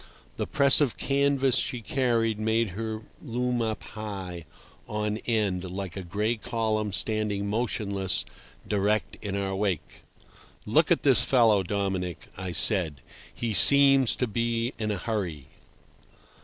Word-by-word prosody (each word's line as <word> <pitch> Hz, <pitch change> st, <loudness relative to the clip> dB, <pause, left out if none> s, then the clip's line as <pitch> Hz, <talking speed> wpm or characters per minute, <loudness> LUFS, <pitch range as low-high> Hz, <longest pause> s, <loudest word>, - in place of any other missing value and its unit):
The -, -, -2 dB
press 140 Hz, 0 st, +5 dB
of 140 Hz, -6 st, +1 dB
canvas 140 Hz, -2 st, +2 dB
she 125 Hz, -, -1 dB
carried 115 Hz, -2 st, 0 dB
made 110 Hz, 0 st, +1 dB
her 110 Hz, +3 st, -5 dB, 0.2 s
loom 125 Hz, -2 st, -1 dB
up 110 Hz, -1 st, -3 dB
high, 95 Hz, -6 st, -7 dB, 0.4 s
end 105 Hz, 0 st, -2 dB, 0.4 s
on, 90 Hz, -, -7 dB
like 95 Hz, -1 st, -5 dB
a 95 Hz, -, -4 dB
gray 105 Hz, +6 st, -2 dB
column 110 Hz, -2 st, -2 dB
standing 105 Hz, 0 st, -1 dB
motionless 100 Hz, -4 st, -1 dB, 0.4 s
directly 105 Hz, +1 st, 0 dB
in 100 Hz, -1 st, -3 dB
our 95 Hz, -1 st, -2 dB
wake. 95 Hz, -5 st, -3 dB, 0.6 s
"Look -, -, +3 dB
at -, -, +3 dB
this -, -, +5 dB
fellow, 115 Hz, -6 st, +4 dB
Dominic," 95 Hz, -3 st, -3 dB
I 95 Hz, -1 st, -5 dB
said. 80 Hz, -, +2 dB, 0.3 s
"He 115 Hz, -2 st, -3 dB
seems 135 Hz, +1 st, +6 dB
to 125 Hz, -, 0 dB
be 115 Hz, +1 st, -1 dB
in 110 Hz, -1 st, -2 dB
a 105 Hz, -, -1 dB
hurry." 90 Hz, -, -4 dB
110 Hz, 135 wpm, -27 LUFS, 95-115 Hz, 0.6 s, seems